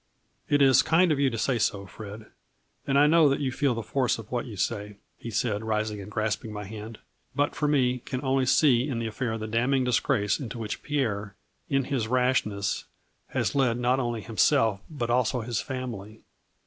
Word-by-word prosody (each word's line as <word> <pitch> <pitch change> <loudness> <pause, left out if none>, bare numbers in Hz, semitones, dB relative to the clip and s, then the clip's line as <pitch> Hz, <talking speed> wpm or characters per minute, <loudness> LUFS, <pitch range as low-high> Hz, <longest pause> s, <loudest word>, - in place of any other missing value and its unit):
" - - -41
It 145 - +5
is 135 -2 +6
kind 170 +1 +3
of 145 - +1
you 140 -1 +3
to 115 - -4
say 120 +1 0
so, 100 -2 0
Fred, 105 +2 -9 0.6
and 140 0 +2
I 145 - +6
know 155 -1 +5
that 140 - +1
you 135 -3 -1
feel 130 -1 +1
the 115 - -4
force 125 +3 0
of 115 -2 -11
what 125 0 -2
you 110 -4 -8
say," 105 +1 -2 0.2
he 120 - -7
said, 110 -2 -1
rising 110 -1 -1
and 100 - -9
grasping 110 0 -2
my 105 0 -5
hand, 110 +2 -8 0.2
" - - -40
but 145 0 +1
for 150 - -1
me, 125 -4 +2
can 130 +2 -5
only 130 -1 +1
see 130 -2 +4
in 125 - -2
die 115 - -2
affair 110 +1 -2
the 110 - -5
damning 125 +4 +1
disgrace 120 -4 +1
into 125 -4 -6
which 110 -2 -4
Pierre, 105 -9 -2 0.3
in 135 0 +2
his 125 -4 -2
rashness, 125 -5 0 0.4
has - - -1
led 130 -4 +2
not 125 +2 +2
only 120 -3 -2
himself 115 -1 +2
but 120 -7 -3
also 125 0 +1
his 115 -1 -2
family. 115 -6 -6
120 Hz, 205 wpm, -27 LUFS, 110-135 Hz, 0.6 s, is